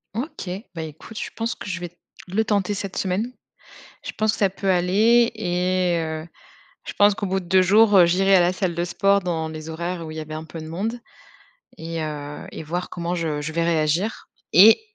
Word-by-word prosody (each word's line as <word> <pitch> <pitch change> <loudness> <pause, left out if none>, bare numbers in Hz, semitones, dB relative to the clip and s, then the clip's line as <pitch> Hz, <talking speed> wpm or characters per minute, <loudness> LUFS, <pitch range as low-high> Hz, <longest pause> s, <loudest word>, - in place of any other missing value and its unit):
OK, 260 - -5 0.2
bah 165 - -5
écoute, 160 +8 -8
je - - -4
pense 230 +1 -2
que - - -8
je 185 -1 -3
vais, 175 -1 -7 0.3
le 210 +5 +1
tenter 205 -2 0
cette 195 -1 -5
semaine. 195 +6 -1 0.7
Je - - -5
pense 215 0 +1
que - - -6
ça 195 -2 +3
peut 195 +1 -2
aller 210 +7 +4
et 180 -3 0
heu, 160 0 -4 0.6
je - - -6
pense 205 0 +4
qu'au 205 - -3
bout 190 0 0
de 185 - -11
2 185 +1 +4
jours, 205 +3 +5
heu, 175 - +8
j'irai 195 +3 +3
à - - +6
la 175 +1 +3
salle 185 -3 -2
de 170 - 0
sport 200 +3 +2
dans 165 -3 -2
les 155 0 -7
horaires 170 +1 -4
où 155 - -7
il 155 - -7
y - - -3
avait 155 0 -7
un 155 +1 -5
peu 165 +1 -9
de 155 - -8
monde 215 +9 -3 0.8
et 165 0 -5
heu 150 -1 -6
et - - -7
voir 175 +4 -4
comment 175 0 -3
je 160 -4 -2
je 150 +2 -4
vais 170 +1 +1
réagir. 165 +5 0 0.2
Et, 210 - +8
180 Hz, 220 wpm, -23 LUFS, 165-200 Hz, 0.8 s, heu